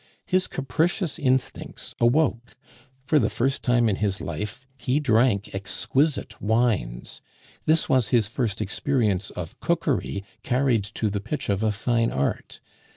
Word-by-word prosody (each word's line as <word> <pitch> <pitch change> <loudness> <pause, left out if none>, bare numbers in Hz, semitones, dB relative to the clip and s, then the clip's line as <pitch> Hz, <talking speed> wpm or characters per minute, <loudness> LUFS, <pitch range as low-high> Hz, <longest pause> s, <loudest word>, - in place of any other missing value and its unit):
His 185 0 +2
capricious 160 +4 -1
instincts 130 -3 -1
awoke; 120 -1 +2 0.5
for 150 +1 +4
the - - +2
first 135 +3 0
time 120 -1 +3
in 100 -3 +1
his 100 -2 0
life 105 +10 -5
he 130 +2 0
drank 115 -6 +2
exquisite 135 +9 -1
wines, 105 - 0 0.4
this 155 +1 +3
was 130 -4 +3
his 115 -5 +3
first 115 -3 -2
experience 105 -3 0
of 85 -2 -7
cookery 150 -11 0 0.2
carried 125 -5 +1
to 110 -2 0
the 100 0 -2
pitch 150 +5 -4
of 100 0 +1
a 110 -1 +2
fine 115 +2 +1
art. 70 +1 -2
120 Hz, 140 wpm, -25 LUFS, 100-135 Hz, 0.5 s, for